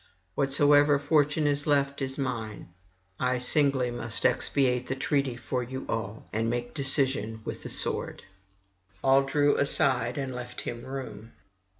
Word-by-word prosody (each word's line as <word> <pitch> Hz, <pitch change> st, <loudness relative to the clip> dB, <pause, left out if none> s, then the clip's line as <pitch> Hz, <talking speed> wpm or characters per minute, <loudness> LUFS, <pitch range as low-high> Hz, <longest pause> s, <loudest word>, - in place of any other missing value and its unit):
Whatsoever 145 Hz, +2 st, +4 dB
fortune 145 Hz, +1 st, +1 dB
is 145 Hz, 0 st, 0 dB
left 140 Hz, -1 st, +1 dB
is 135 Hz, 0 st, -3 dB
mine: 115 Hz, -8 st, -5 dB, 0.5 s
I 125 Hz, 0 st, 0 dB
singly 130 Hz, -1 st, +5 dB
must 115 Hz, -2 st, -2 dB
expiate 125 Hz, -3 st, +1 dB
the 135 Hz, -, -2 dB
treaty 135 Hz, -1 st, -1 dB
for 125 Hz, +1 st, -4 dB
you 130 Hz, +2 st, -7 dB
all, 110 Hz, -1 st, -5 dB
and 115 Hz, +1 st, -1 dB
make 120 Hz, 0 st, -4 dB
decision 135 Hz, -5 st, -1 dB
with -, -, -5 dB
the -, -, -6 dB
sword.' -, -, -1 dB, 0.8 s
All 135 Hz, +1 st, +4 dB
drew 145 Hz, +1 st, +1 dB
aside 130 Hz, -4 st, +1 dB
and 135 Hz, -2 st, -4 dB
left 125 Hz, 0 st, -7 dB
him 120 Hz, 0 st, -7 dB
room. 130 Hz, -4 st, -8 dB
135 Hz, 140 wpm, -27 LUFS, 120-140 Hz, 0.8 s, singly